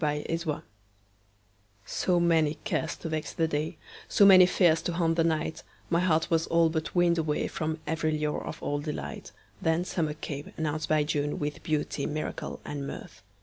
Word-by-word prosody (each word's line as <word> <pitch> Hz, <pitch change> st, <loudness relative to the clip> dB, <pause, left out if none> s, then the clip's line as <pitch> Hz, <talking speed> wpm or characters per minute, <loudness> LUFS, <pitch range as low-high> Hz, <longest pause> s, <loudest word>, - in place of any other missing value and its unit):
Summer 150 Hz, -1 st, +1 dB
Magic 165 Hz, 0 st, -3 dB, 1.2 s
SO 180 Hz, -2 st, +1 dB
many 160 Hz, -3 st, +3 dB
cares 160 Hz, -7 st, -1 dB
to 165 Hz, -, -6 dB
vex 155 Hz, -2 st, -3 dB
the 165 Hz, -, +1 dB
day, 155 Hz, +2 st, -2 dB, 0.3 s
So 200 Hz, -, +5 dB
many 185 Hz, -2 st, +9 dB
fears 170 Hz, -3 st, +3 dB
to 175 Hz, -, -2 dB
haunt 165 Hz, -1 st, +1 dB
the 165 Hz, -, +3 dB
night, 160 Hz, -1 st, -1 dB, 0.3 s
My 170 Hz, -, +4 dB
heart 165 Hz, -3 st, +2 dB
was 165 Hz, 0 st, +2 dB
all 165 Hz, -1 st, +4 dB
but 160 Hz, +1 st, -3 dB
weaned 175 Hz, -1 st, +4 dB
awayFrom 155 Hz, 0 st, -1 dB
every 155 Hz, 0 st, 0 dB
lure 150 Hz, 0 st, -1 dB
of -, -, -7 dB
old 145 Hz, +1 st, -2 dB
delight. 150 Hz, -, -5 dB, 0.3 s
Then 160 Hz, +2 st, +1 dB
summer 155 Hz, -5 st, -1 dB
came, 145 Hz, -1 st, -6 dB
announced 155 Hz, -1 st, -2 dB
by 155 Hz, -1 st, +3 dB
June, 145 Hz, -1 st, -1 dB
With 145 Hz, 0 st, -3 dB
beauty, 150 Hz, -3 st, -1 dB
miracle 155 Hz, 0 st, -4 dB
and 140 Hz, -1 st, -4 dB
mirth. 105 Hz, -4 st, -9 dB
160 Hz, 175 wpm, -28 LUFS, 150-165 Hz, 1.2 s, many